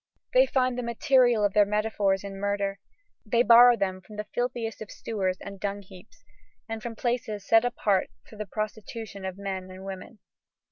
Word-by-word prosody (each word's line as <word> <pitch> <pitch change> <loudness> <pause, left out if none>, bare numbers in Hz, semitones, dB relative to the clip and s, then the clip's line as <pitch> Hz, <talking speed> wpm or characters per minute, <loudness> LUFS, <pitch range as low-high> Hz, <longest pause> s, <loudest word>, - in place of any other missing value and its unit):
They - - +6
find 255 -2 +1
the - - -1
material 240 -1 +3
of 200 - 0
their 210 - +6
metaphors 205 -2 0
in 195 -1 -7
murder, 200 0 -1 0.4
they 235 +1 +2
borrow 240 +1 +8
them 185 -2 -2
from 210 +3 -13
the 210 - -3
filthiest 240 -2 -2
of 215 - -7
sewers 190 -5 -2
and 200 -1 -9
dungheaps, 200 0 -7 0.4
and 225 -1 -5
from 230 0 -6
places 230 -4 -2
set 225 0 +6
apart 205 -5 +1 0.2
for - - -14
the 210 -1 -6
prostitution 215 -1 -6
of 190 0 -5
men 190 -2 -5
and 185 +1 -10
women. 195 +3 -8
210 Hz, 175 wpm, -27 LUFS, 195-235 Hz, 0.4 s, borrow